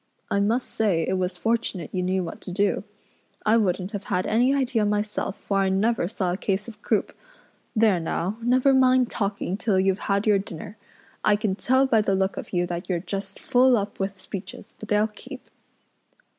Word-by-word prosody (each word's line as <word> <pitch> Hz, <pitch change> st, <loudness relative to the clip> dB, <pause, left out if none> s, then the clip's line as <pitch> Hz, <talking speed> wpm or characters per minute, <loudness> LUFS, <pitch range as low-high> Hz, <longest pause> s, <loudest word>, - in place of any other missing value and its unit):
I 200 Hz, -, +2 dB
must 225 Hz, +5 st, +1 dB
say 190 Hz, -7 st, +1 dB
it 190 Hz, 0 st, 0 dB
was 180 Hz, 0 st, -2 dB
fortunate 225 Hz, -6 st, -1 dB
you 185 Hz, -, 0 dB
knew 185 Hz, +1 st, 0 dB
what 165 Hz, -, -7 dB
to -, -, -7 dB
do. 200 Hz, +1 st, +1 dB, 0.6 s
I 220 Hz, +1 st, +5 dB
wouldn't 190 Hz, -2 st, 0 dB
have 205 Hz, -3 st, -5 dB
had 180 Hz, +1 st, 0 dB
any 245 Hz, +4 st, +3 dB
idea 255 Hz, -5 st, +1 dB
myself, 210 Hz, -1 st, -1 dB
for 200 Hz, -1 st, -1 dB
I 195 Hz, -1 st, +2 dB
never 195 Hz, 0 st, +1 dB
saw 185 Hz, -3 st, -1 dB
a -, -, -3 dB
case 200 Hz, +2 st, -1 dB
of 220 Hz, -2 st, -11 dB
croup. -, -, 0 dB, 0.6 s
There 215 Hz, -5 st, +4 dB
now, 180 Hz, +5 st, -2 dB
never 255 Hz, +3 st, +3 dB
mind 255 Hz, -1 st, +4 dB
talking 200 Hz, -2 st, -2 dB
till 205 Hz, -3 st, +1 dB
you've 190 Hz, +1 st, +2 dB
had 200 Hz, +1 st, +2 dB
your 210 Hz, -2 st, +4 dB
dinner. 195 Hz, +1 st, -8 dB, 0.5 s
I 210 Hz, -, +4 dB
can 210 Hz, -2 st, -1 dB
tell 260 Hz, +7 st, +2 dB
by 230 Hz, -5 st, +3 dB
the 195 Hz, -2 st, +1 dB
look 190 Hz, 0 st, 0 dB
of -, -, -7 dB
you 175 Hz, -1 st, +1 dB
that 175 Hz, +1 st, -5 dB
you're 180 Hz, -2 st, +1 dB
just 195 Hz, +2 st, -5 dB
full 250 Hz, 0 st, +4 dB
up 205 Hz, 0 st, -4 dB
with 195 Hz, 0 st, -2 dB
speeches, 190 Hz, +1 st, -8 dB
but 215 Hz, -, -9 dB
they'll 210 Hz, +1 st, +3 dB
keep." 255 Hz, +5 st, -10 dB
205 Hz, 200 wpm, -25 LUFS, 190-225 Hz, 0.6 s, I